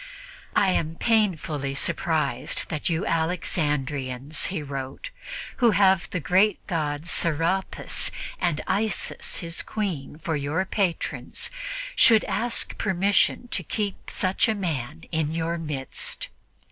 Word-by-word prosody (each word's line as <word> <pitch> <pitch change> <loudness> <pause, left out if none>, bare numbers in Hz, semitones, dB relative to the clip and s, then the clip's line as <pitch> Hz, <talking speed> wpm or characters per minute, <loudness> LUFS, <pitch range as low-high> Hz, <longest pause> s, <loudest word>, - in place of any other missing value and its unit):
"I 195 - +5
am 165 -2 0
painfully 165 - +1
surprised - - 0
that 155 +1 -1
you 170 +4 0
Alexandrians," 150 - 0
he 180 -5 -3
wrote, 140 - -6 0.5
"who 240 -2 +5
have 190 -2 +4
the 180 - -2
great 185 +6 +3
god 150 -2 -2
Serapis 170 +3 +1 0.3
and 170 -5 +1
Isis 210 +2 0
his 165 0 -1
Queen 180 -10 -3
for 160 0 -2
your 150 +6 0
patrons, 190 -3 -1 0.4
should 225 - +7
ask 240 0 0
permission 200 +4 +2
to - - +1
keep 205 -3 -3
such 190 +4 +2
a 220 - +2
man 160 - -3
in 160 -1 0
your 165 +1 -1
midst. 150 -4 -1
165 Hz, 120 wpm, -25 LUFS, 150-195 Hz, 0.5 s, should